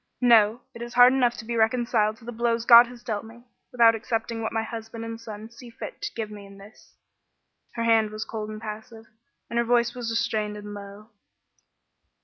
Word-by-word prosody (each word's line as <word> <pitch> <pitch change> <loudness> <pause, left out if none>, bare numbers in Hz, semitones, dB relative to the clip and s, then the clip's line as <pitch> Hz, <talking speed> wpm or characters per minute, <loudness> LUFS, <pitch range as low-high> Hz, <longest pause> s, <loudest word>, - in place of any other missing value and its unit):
No! 230 -1 +4
It 235 - -11
is 240 +1 -7
hard 245 +1 +7
enough 245 -2 +1
to 220 - -8
be 235 +1 -3
reconciled 225 -1 +1
to 225 - -17
the 240 - -5
blows 230 0 -1
God 235 0 +9
has 240 -1 -13
dealt 215 -3 -3
me, 230 +2 -14 0.3
without 230 -2 +5
accepting 225 0 -3
what 220 - -3
my 225 0 -1
husband 225 0 -7
and 230 0 -7
son 220 0 -9
see 240 +1 -13
fit 230 - -9
to - - -4
give 220 -2 -4
me 205 -1 -10
in 195 0 -15
this." 200 +3 -17 0.8
Her 230 - -2
hand 225 -2 +3
was 215 +1 -6
cold 215 -1 -6
and 215 0 -7
passive, 220 +1 -9 0.4
and 235 - -2
her - - +3
voice 235 0 +2
was 245 -2 -5
restrained 225 -2 -1
and 205 0 -8
low. 205 +2 -11
225 Hz, 205 wpm, -25 LUFS, 215-235 Hz, 0.8 s, God